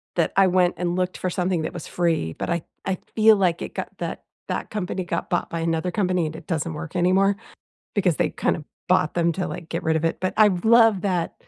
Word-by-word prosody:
that - - +1
I 195 - +7
went 180 -1 +3
and 175 -1 -1
looked 185 0 -1
for 185 - -2
something 180 -2 0
that 160 - -4
was 175 - -7
free, 165 - 0
but - - -5
I 170 -1 0 0.2
I 190 -1 -1 0.2
feel 220 0 +7
like 175 -3 +1
it - - -7
got - - -3
that - - -4 0.3
that - - -3
company 190 -2 -3
got 175 - -3
bought 175 - 0
by 170 - -2
another 165 +1 0
company, 180 -3 +1
and 155 - -7
it 160 - -10
doesn't 165 -2 -2
work 160 +3 -7
anymore 190 +3 +3 0.6
because 185 -6 +2
they - - +1
kind - - 0
of 155 - -9 0.2
bought 180 -4 +2
them 170 -1 +2
to, 185 +2 -2
like, 165 - -7
get 165 - -3
rid 160 0 +1
of 160 - -1
it, 165 - 0
but 185 - 0
I 215 -1 +7
love 220 +2 +4
that 180 -4 -1
180 Hz, 240 wpm, -24 LUFS, 165-190 Hz, 0.6 s, I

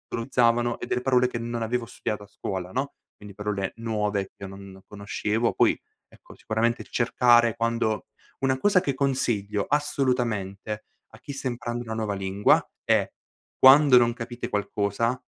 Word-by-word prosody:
utilizzavano 120 0 +1
e - - -6
delle 125 - -1
parole 125 -1 +3
che 125 - -5
non 120 0 -4
avevo 120 +1 -1
studiato 105 -2 -5
a - - -14
scuola, 95 -3 -5
no. 135 +5 -3 0.2
Quindi 105 -2 -12
parole 105 -1 -3
nuove 105 -3 -1
che - - -36
io - - -4
non 95 0 -11
conoscevo. 105 +2 -1
Poi, - - +3 0.3
ecco, - - -17
sicuramente 115 +2 -1
cercare 120 -1 +3
quando 115 -2 0 0.3
una 130 -1 +1
cosa 195 +6 +4
che 140 -6 -1
consiglio 115 -7 0
assolutamente 120 -8 -1 0.2
a 110 - -16
chi 140 +3 -8
sta 135 -1 -4
imparando 120 0 -4
una 110 -1 -5
nuova 110 -2 -2
lingua 95 +1 +2 0.2
è: - - +2 0.5
quando 135 0 +8
non 120 -1 +4
capite 120 0 -6
qualcosa 105 +4 -1
115 Hz, 155 wpm, -25 LUFS, 105-125 Hz, 0.5 s, quando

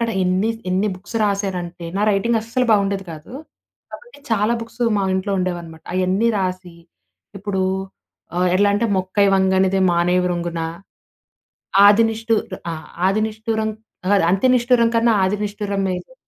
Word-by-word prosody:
అక్కడ 230 0 0
ఎన్ని 185 +4 +1 0.2
ఎన్ని 190 +3 +1
బుక్స్ 190 +5 -8
రాశనంటే 185 -4 -2
నా 200 - 0
రైటింగ్ 225 +3 +1
అస్సలు 230 +3 -1
బావుండేది 200 -2 +2
కాదు. 155 +7 -11 0.6
కాబట్టి 485 -10 -12
చాలా 215 0 +2
బుక్స్ 230 +1 -6
మా 200 - 0
ఇంట్లో 190 +2 -1
ఉండేవన్నమాట. 175 -3 -4
అయన్నీ 185 +5 +1
రాసి 185 -2 -3 0.6
ఇప్పుడు 195 -1 -2 0.9
ఎట్లా 205 +2 +4
అంటే 230 +3 +1
మొక్కై 185 +2 +1
వంగనిదే 190 0 +2
మానై 175 +1 +2
వ్రంగున. 170 -1 -2 1.3
ఆదినిష్టు 225 +1 +3 0.2
ఆహ్, - - -4 0.2
ఆహ్, 155 - -9 0.2
ఆది 200 +3 +1
నిష్ఠురం 220 0 -2 0.4
కాదు 200 -3 +4
అంత 195 +4 0
నిష్ఠురం 240 -1 +3
కన్నా 230 0 +3
ఆది 190 +2 +1
నిష్ఠురం 205 -1 -3
మేలు. 185 - -5
200 Hz, 135 wpm, -20 LUFS, 185-220 Hz, 1.3 s, ఎట్లా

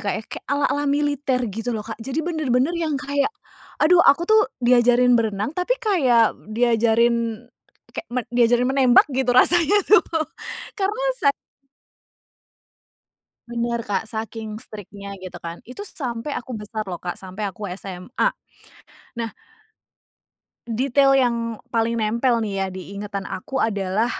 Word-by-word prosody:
Kak - - +1
ya, - - -7
kek - - -7
ala-ala 285 +1 +1
militer 285 -2 0
gitu 225 +4 -3
loh 210 - -5
Kak, 225 -1 -6
jadi 270 +6 -4
bener-bener 305 -4 +1
yang 320 -4 -1
kayak, 280 +3 0 0.5
aduh 350 +3 +6
aku 310 +5 +5
tuh 435 0 +6 0.2
diajarin 245 0 +5
berenang, 215 +2 -1
tapi 360 +8 +1
kayak 260 - +3 0.2
diajarin 230 0 +2 0.5
kayak - - -7
men 250 -1 -1
diajarin 245 0 +4
menembak 260 -3 +5
gitu 260 -1 -1
rasanya 345 +7 +5
tuh 430 - +7 0.8
karena 420 +6 -1
sa 280 - +4 2.2
Bener 235 0 -2
Kak 205 0 -2
saking 220 -1 -5
strict-nya 200 -1 -9
gitu 185 -1 -9
kan, 170 0 -6
itu 255 - -8
sampai 260 - -5
aku 255 - -8
besar 215 0 -5
loh 180 -2 -5
Kak, 175 -1 -4
sampai 190 +2 -8
aku 205 +2 -7
SMA, 195 - -2 0.9
nah 230 -1 -2 1.4
detail 270 +4 +2
yang 245 -2 +2 0.4
paling 230 0 +1
nempel 235 +3 +1
nih 200 -3 -2
ya - - 0
diingatan 200 +2 -6
aku 265 +8 -4
adalah, 205 -1 0
235 Hz, 135 wpm, -22 LUFS, 215-275 Hz, 2.2 s, tuh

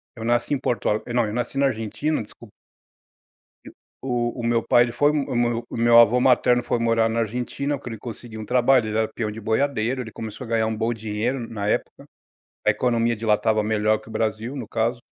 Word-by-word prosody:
Eu 115 - -8
nasci 120 +4 +1
em 140 - 0
Porto 120 -2 -2
Al 105 - 0
não 120 -1 +2
eu 105 - -4
nasci 120 +3 -3
na 140 - +3
Argentina, 130 +6 -2
desculpa 110 +1 -15 1.5
O 120 -1 -2
o - - -4
meu 115 0 +2
pai 120 - +4
ele 120 - -4
foi 145 +4 +3
o 145 -4 -1
meu 120 -1 0
o - - -5
meu 115 0 +5
avô 120 +1 +6
materno 125 -1 +4
foi 120 - -1
morar 115 -1 +2
na 115 +1 -1
Argentina, 125 +5 -2
que 125 - -8
ele 115 -2 -7
conseguiu 115 -1 -8
um - - -5
trabalho, 125 -1 +3
ele 110 +1 -1
era 110 -1 +1
peão 110 -3 -3
de 110 - -8
boiadeiro, 120 +2 0
ele 115 -2 -9
começou 110 +2 -7
a - - -10
ganhar 115 -1 +1
um 110 0 -2
bom 115 +2 0
dinheiro 110 +4 -2
na 100 -2 -4
época. - - -2 0.6
A - - +6
economia 120 -1 +1
de 110 +2 -6
lá 105 - +5
estava 110 0 +1
melhor 110 0 +1
que 110 - -16
o - - -10
Brasil, 110 +3 -2
no 115 -4 -6
caso 115 +2 -1
115 Hz, 225 wpm, -23 LUFS, 110-125 Hz, 1.5 s, avô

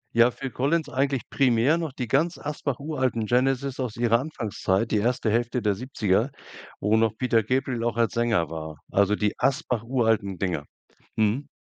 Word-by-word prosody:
Ja, 120 +1 +6
Phil 135 +1 -6
Collins 145 +4 0
eigentlich 135 -1 -1
primär, 130 +3 +3
noch 165 -4 -3
die 125 -3 -4
ganz 160 +8 +1
Asbach 145 -3 -3
uralten 130 -7 -1
Genesis 135 +2 +1
aus 125 -4 -3
ihrer 115 0 +3
Anfangszeit, 115 -6 -1
die 110 - +1
erste 120 +1 +1
Hälfte 120 +2 0
der 105 -2 +1
70er, 115 0 0 0.5
wo 105 +2 +2
noch 110 -1 +2
Peter 115 -3 +2
Gabriel 125 0 -1
auch 120 -1 0
als 115 -2 +2
Sänger 115 -8 +1
war. 80 -2 -6
Also, 100 +1 +3
die 105 -1 0
Asbach 130 -5 0
uralten 110 -6 0
Dinger. 85 -7 -2 0.5
Mhm. 110 +6 +1
120 Hz, 170 wpm, -25 LUFS, 110-135 Hz, 0.5 s, Ja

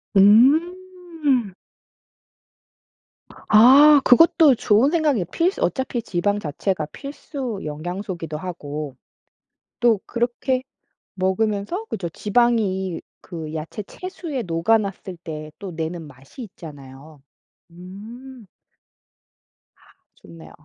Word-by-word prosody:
음. 300 - +3 2.0
아 275 +7 +7
그것도 310 +1 +6
좋은 225 +5 +3
생각이에요. 300 - +1
필수 335 - -1
어차피 260 -2 -1
지방 205 0 -1
자체가 160 0 -2
필수 275 -5 -7
영양소이기도 170 +1 -5
하고. 150 -5 -6 0.8
또 230 -4 +3
그렇게 245 +2 -1 0.5
먹으면서 205 - -1
그죠 180 - -4
지방이 205 -3 0 0.2
그 160 -4 -8
야채 160 +7 -6
채수에 325 - -6
녹아났을 190 +2 -1
때 155 -2 -7
또 195 -3 -7
내는 160 0 -5
맛이 135 - -13
있잖아요. 150 - -12 0.5
음. 220 +8 -12 1.3
아 - - -31 0.3
좋네요. 80 -3 -15
205 Hz, 205 characters per minute, -22 LUFS, 170-260 Hz, 2.0 s, 아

